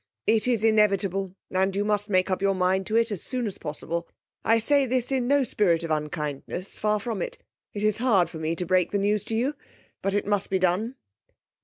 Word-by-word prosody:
It 220 Hz, +1 st, +2 dB
is 235 Hz, -4 st, +1 dB
inevitable, 195 Hz, -3 st, +2 dB, 0.2 s
and 190 Hz, +1 st, +1 dB
you 205 Hz, +1 st, 0 dB
must 210 Hz, 0 st, 0 dB
make 185 Hz, -1 st, +2 dB
up 185 Hz, -, -1 dB
your 195 Hz, 0 st, +2 dB
mind 185 Hz, +1 st, +1 dB
to 215 Hz, -, -1 dB
it 230 Hz, 0 st, +3 dB
as 200 Hz, -, -3 dB
soon 250 Hz, -2 st, -2 dB
as 205 Hz, -, -5 dB
possible. 165 Hz, +2 st, -4 dB, 0.4 s
I 225 Hz, -, +4 dB
say 275 Hz, +4 st, +3 dB
this 250 Hz, +1 st, 0 dB
in 255 Hz, -2 st, 0 dB
no 285 Hz, +1 st, +4 dB
spirit 175 Hz, -8 st, +1 dB
of 165 Hz, -, -3 dB
unkindness; 150 Hz, +3 st, -3 dB
far 210 Hz, 0 st, +1 dB
from 220 Hz, -2 st, -4 dB
it. -, -, -4 dB, 0.4 s
It 205 Hz, -, -3 dB
is 215 Hz, 0 st, +2 dB
hard 210 Hz, -9 st, +3 dB
to 160 Hz, -, -8 dB
me 160 Hz, +1 st, -1 dB
to 180 Hz, -, -2 dB
break 180 Hz, 0 st, +2 dB
the 205 Hz, -, 0 dB
news 205 Hz, +1 st, +1 dB
to 225 Hz, -, -2 dB
you, 255 Hz, +6 st, +1 dB, 0.5 s
but 195 Hz, 0 st, 0 dB
it 205 Hz, -, 0 dB
must 205 Hz, -1 st, 0 dB
be 190 Hz, -, +2 dB
done. 185 Hz, +7 st, 0 dB
200 Hz, 220 wpm, -26 LUFS, 185-225 Hz, 0.5 s, I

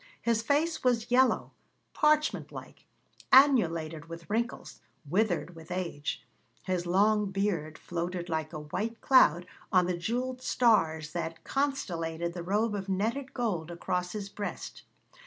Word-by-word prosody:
His 230 Hz, -1 st, +1 dB
face 300 Hz, +7 st, 0 dB
was 240 Hz, -2 st, +1 dB
yellow, 255 Hz, +1 st, +3 dB, 0.4 s
parchment 305 Hz, 0 st, +2 dB
like, -, -, -11 dB, 0.4 s
annulated 165 Hz, -, +4 dB
with 165 Hz, 0 st, -9 dB
wrinkles, 235 Hz, -, -3 dB, 0.3 s
withered 180 Hz, 0 st, 0 dB
with 160 Hz, 0 st, -12 dB
age; 175 Hz, -5 st, -4 dB, 0.4 s
his 180 Hz, -2 st, -2 dB
long 205 Hz, +3 st, +3 dB
beard 190 Hz, -6 st, -2 dB
floated 175 Hz, +1 st, -4 dB
like 160 Hz, -2 st, -2 dB
a 155 Hz, -2 st, -6 dB
white 215 Hz, +10 st, -4 dB
cloud 175 Hz, -, +5 dB, 0.3 s
on 180 Hz, -1 st, +4 dB
the 180 Hz, 0 st, -1 dB
jewelled 250 Hz, +8 st, -3 dB
stars 160 Hz, -13 st, +2 dB
that 165 Hz, 0 st, -4 dB
constellated 170 Hz, -, -2 dB
the 175 Hz, -, -5 dB
robe 210 Hz, +5 st, 0 dB
of 195 Hz, -1 st, -4 dB
netted 230 Hz, +8 st, -1 dB
gold 190 Hz, -10 st, -2 dB
across 180 Hz, +1 st, -3 dB
his 205 Hz, -2 st, -4 dB
breast. 205 Hz, +1 st, -6 dB
190 Hz, 135 wpm, -29 LUFS, 170-235 Hz, 0.4 s, cloud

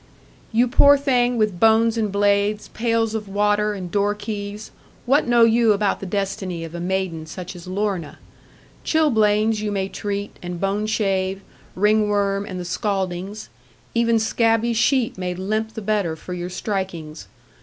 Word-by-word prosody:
'You 240 Hz, +2 st, +3 dB
poor 285 Hz, +3 st, +6 dB
thing, 250 Hz, -3 st, +1 dB
with 210 Hz, -5 st, 0 dB
bones 225 Hz, +1 st, +4 dB
and 215 Hz, -3 st, -1 dB
blades, 205 Hz, +1 st, +1 dB
pails 230 Hz, -1 st, 0 dB
of 215 Hz, -2 st, -4 dB
water, 210 Hz, +1 st, +1 dB
and 180 Hz, -3 st, -6 dB
door 205 Hz, +1 st, +1 dB
keys, 210 Hz, 0 st, -6 dB, 0.3 s
what 270 Hz, +3 st, +3 dB
know 240 Hz, -1 st, +5 dB
you 230 Hz, -1 st, +5 dB
about 205 Hz, -1 st, 0 dB
the 195 Hz, -, -6 dB
destiny 190 Hz, -3 st, -3 dB
of 165 Hz, 0 st, -8 dB
a 170 Hz, -, -5 dB
maiden 175 Hz, -3 st, -2 dB
such 180 Hz, +3 st, -7 dB
as 175 Hz, 0 st, -11 dB
Lorna? 185 Hz, -4 st, -2 dB, 0.7 s
Chilblains 220 Hz, -8 st, +2 dB
you 210 Hz, -1 st, -2 dB
may 195 Hz, -1 st, -1 dB
treat, 205 Hz, 0 st, -4 dB
and 175 Hz, -1 st, -5 dB
bone 200 Hz, +3 st, -1 dB
shave, 195 Hz, -3 st, 0 dB, 0.3 s
ringworm, 205 Hz, 0 st, +1 dB
and 185 Hz, -3 st, -5 dB
the 180 Hz, -, -5 dB
scaldings; 195 Hz, +1 st, -3 dB, 0.4 s
even 230 Hz, 0 st, +3 dB
scabby 225 Hz, +1 st, +1 dB
sheep 235 Hz, -2 st, +1 dB
may 180 Hz, -1 st, -3 dB
limp 215 Hz, +4 st, -2 dB
the 220 Hz, -, -5 dB
better 200 Hz, -6 st, 0 dB
for 180 Hz, +3 st, -8 dB
your 175 Hz, 0 st, -4 dB
strikings. 180 Hz, -5 st, -4 dB
205 Hz, 155 wpm, -22 LUFS, 190-220 Hz, 0.7 s, poor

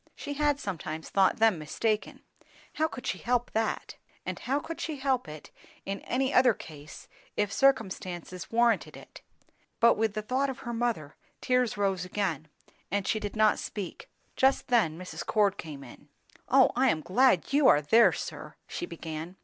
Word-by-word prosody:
She 285 Hz, -, -5 dB
had 290 Hz, 0 st, +1 dB
sometimes 160 Hz, -, -5 dB
thought 195 Hz, -1 st, +3 dB
them 220 Hz, -6 st, +3 dB
mistaken; 215 Hz, +8 st, -2 dB, 0.5 s
how 315 Hz, -, +1 dB
could 255 Hz, -, -9 dB
she -, -, -2 dB
help 245 Hz, 0 st, 0 dB
that? 220 Hz, 0 st, -2 dB, 0.3 s
and -, -, -4 dB
how 275 Hz, +3 st, -1 dB
could 330 Hz, +2 st, -7 dB
she 315 Hz, -, -3 dB
help 265 Hz, -, 0 dB
it 150 Hz, 0 st, -10 dB, 0.3 s
in 195 Hz, 0 st, -3 dB
any 265 Hz, +2 st, -1 dB
other 250 Hz, -4 st, +5 dB
case, 150 Hz, -3 st, -11 dB, 0.3 s
if 205 Hz, -1 st, 0 dB
circumstances 185 Hz, -8 st, 0 dB
warranted 235 Hz, 0 st, +2 dB
it? -, -, -14 dB, 0.6 s
But 235 Hz, 0 st, +5 dB
with 220 Hz, -1 st, 0 dB
the 215 Hz, -, -2 dB
thought 265 Hz, +5 st, 0 dB
of 260 Hz, -, -6 dB
her 235 Hz, -, -5 dB
mother, 230 Hz, -11 st, -2 dB, 0.2 s
tears 250 Hz, -3 st, +1 dB
rose 195 Hz, -3 st, 0 dB
again, 180 Hz, -5 st, -2 dB, 0.4 s
and 200 Hz, +1 st, -1 dB
she 215 Hz, -, +1 dB
did 205 Hz, 0 st, -5 dB
not 215 Hz, -1 st, +3 dB
speak. 200 Hz, -5 st, -6 dB, 0.3 s
Just 265 Hz, +1 st, +2 dB
then 215 Hz, -11 st, +2 dB
Mrs. 175 Hz, -2 st, -7 dB
Cord 205 Hz, -3 st, +1 dB
came 145 Hz, -4 st, -7 dB
in. 135 Hz, +3 st, -14 dB, 0.4 s
"O 265 Hz, 0 st, +6 dB
I 260 Hz, +2 st, +4 dB
am 155 Hz, -, 0 dB
glad 245 Hz, -, +3 dB
you 285 Hz, -1 st, +5 dB
are -, -, +7 dB
there, 225 Hz, +11 st, +6 dB
sir!" -, -, -7 dB
she 350 Hz, -, -5 dB
began. 160 Hz, -, -7 dB
215 Hz, 175 wpm, -29 LUFS, 180-250 Hz, 0.6 s, are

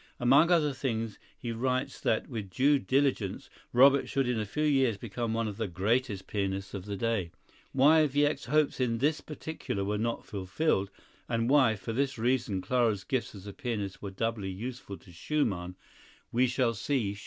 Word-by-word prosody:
Among 140 Hz, +7 st, +5 dB
other 155 Hz, -5 st, +3 dB
things 115 Hz, -5 st, -3 dB, 0.2 s
he 120 Hz, -, -5 dB
writes 130 Hz, +3 st, -2 dB
that, 110 Hz, -, +1 dB
with 110 Hz, -6 st, -5 dB
due 140 Hz, +10 st, +3 dB
diligence, 130 Hz, -7 st, 0 dB, 0.2 s
Robert 135 Hz, +1 st, +5 dB
should 135 Hz, -2 st, 0 dB
in 125 Hz, -2 st, 0 dB
a 105 Hz, -, -3 dB
few 150 Hz, +9 st, -2 dB
years 135 Hz, -7 st, +3 dB
become 115 Hz, +2 st, -3 dB
one 115 Hz, -1 st, 0 dB
of 105 Hz, -2 st, -5 dB
the 110 Hz, -2 st, -2 dB
greatest 100 Hz, +3 st, 0 dB
pianists 95 Hz, -1 st, -3 dB
of 100 Hz, -2 st, -5 dB
the 100 Hz, -1 st, -4 dB
day. 105 Hz, -4 st, -1 dB, 0.4 s
Why 150 Hz, +4 st, +5 dB
Wieck's 145 Hz, +1 st, +1 dB
hopes 150 Hz, -2 st, +1 dB
in 120 Hz, -3 st, +1 dB
this 145 Hz, +6 st, +1 dB
particular 150 Hz, -10 st, -5 dB
were 105 Hz, +1 st, -1 dB
not 115 Hz, +1 st, -2 dB
fulfilled, 100 Hz, -, -1 dB, 0.4 s
and 115 Hz, +1 st, 0 dB
why, 130 Hz, -6 st, +5 dB
for 115 Hz, +3 st, -5 dB
this 135 Hz, +1 st, 0 dB
reason, 115 Hz, -5 st, 0 dB
Clara's 110 Hz, -1 st, +1 dB
gifts 130 Hz, -4 st, -2 dB
as 95 Hz, -1 st, -11 dB
a 100 Hz, -, -7 dB
pianist 105 Hz, -6 st, -4 dB
were 100 Hz, -, -5 dB
doubly 105 Hz, 0 st, -2 dB
useful 105 Hz, 0 st, -6 dB
to 90 Hz, -, -17 dB
Schumann, 90 Hz, -, -2 dB, 0.6 s
we 125 Hz, +2 st, +3 dB
shall 125 Hz, -1 st, +1 dB
see 115 Hz, -2 st, -1 dB
shortly. 100 Hz, -, -11 dB
115 Hz, 180 wpm, -30 LUFS, 100-135 Hz, 0.6 s, Among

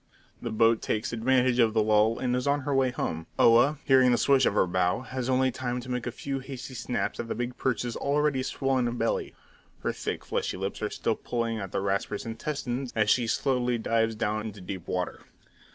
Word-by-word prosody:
The -, -, -3 dB
boat 115 Hz, 0 st, +3 dB
takes 110 Hz, +2 st, -2 dB
advantage 125 Hz, +1 st, +2 dB
of 115 Hz, -2 st, +4 dB
the 110 Hz, -, +4 dB
lull, 110 Hz, +1 st, +3 dB
and 125 Hz, -1 st, 0 dB
is 125 Hz, +2 st, -1 dB
on 145 Hz, +1 st, +2 dB
her 140 Hz, +1 st, -2 dB
way 135 Hz, -1 st, +3 dB
home. 80 Hz, -9 st, -3 dB
Oa, 120 Hz, +6 st, +5 dB
hearing 130 Hz, -3 st, +5 dB
the 120 Hz, -, +3 dB
swish 135 Hz, 0 st, +4 dB
of -, -, 0 dB
her -, -, +4 dB
bow, 90 Hz, +3 st, +1 dB
has 130 Hz, -1 st, -4 dB
only 130 Hz, 0 st, +3 dB
time 125 Hz, 0 st, -3 dB
to 125 Hz, +1 st, -7 dB
make 125 Hz, -1 st, -2 dB
a -, -, -2 dB
few 135 Hz, +3 st, -4 dB
hasty 130 Hz, -1 st, -8 dB
snaps 125 Hz, 0 st, -3 dB
at 120 Hz, -, -3 dB
the -, -, -3 dB
big 120 Hz, +1 st, -3 dB
perch's 120 Hz, -2 st, -1 dB
already 145 Hz, -1 st, +1 dB
swollen 130 Hz, -2 st, 0 dB
belly; 115 Hz, -1 st, -1 dB, 0.5 s
her -, -, 0 dB
thick, -, -, -4 dB
fleshy -, -, -2 dB
lips 95 Hz, +3 st, -4 dB
are 105 Hz, -, -1 dB
still 115 Hz, -, -1 dB
pulling 115 Hz, -1 st, -2 dB
at 95 Hz, -3 st, -6 dB
the -, -, -1 dB
Rasper's 100 Hz, +1 st, -2 dB
intestines 125 Hz, +1 st, -3 dB
as 110 Hz, -2 st, +3 dB
she 120 Hz, -3 st, +2 dB
slowly 125 Hz, 0 st, +1 dB
dives 115 Hz, 0 st, +1 dB
down 110 Hz, 0 st, -1 dB
into 105 Hz, -1 st, -8 dB
deep 90 Hz, -1 st, -7 dB
water. 90 Hz, -1 st, -3 dB
120 Hz, 210 wpm, -28 LUFS, 110-130 Hz, 0.5 s, Oa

